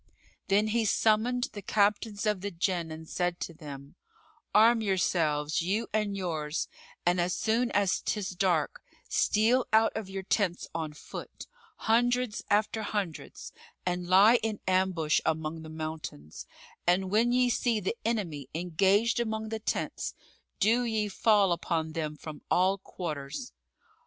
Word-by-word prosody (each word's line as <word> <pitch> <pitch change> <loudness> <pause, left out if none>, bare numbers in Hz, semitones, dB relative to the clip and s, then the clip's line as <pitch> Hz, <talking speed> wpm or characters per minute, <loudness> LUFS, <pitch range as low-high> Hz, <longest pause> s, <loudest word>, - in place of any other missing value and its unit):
Then 205 +2 +3
he 230 +1 +1
summoned 225 +4 +2
the 205 - -6
Captains 205 +1 +1
of 210 -3 +1
the 205 - -2
Jann 175 -2 -1
and 160 0 -8
said 175 +1 -1
to 170 - -4
them, 140 -3 -10 0.6
"Arm 225 +2 +5
yourselves, 160 -7 +1
you 205 +7 -1
and 210 -2 0
yours; 160 -5 -2 0.4
and, 175 0 +3
as 175 +1 0
soon 235 +2 +1
as 200 -4 +1
'tis 205 -3 -2
dark, 180 -4 0 0.3
steal 235 +4 +2
out 220 +1 +4
of 220 -3 -4
your 195 0 -5
tents 190 -2 0
on 160 -2 -3
foot, 150 - -9 0.3
hundreds 245 0 +1
after 215 +2 +2
hundreds, 205 -6 -4 0.3
and 180 0 -2
lie 205 +6 +7
in 215 -2 -2
ambush 185 -4 +2
among 160 0 -2
the 160 - -9
mountains; 155 - -7 0.4
and 185 +1 +2
when 230 +3 +3
ye 250 0 +4
see 235 -2 +1
the 200 +3 -2
enemy 175 - -2
engaged 195 +7 +2
among 220 -2 -2
the 220 0 -3
tents, 215 - -3 0.4
do 235 +4 +3
ye 220 -3 0
fall 205 -1 +3
upon 165 -1 -1
them 155 -2 -3
from 150 0 -9
all 190 +2 +3
quarters. 160 - -6
195 Hz, 145 wpm, -29 LUFS, 165-220 Hz, 0.6 s, lie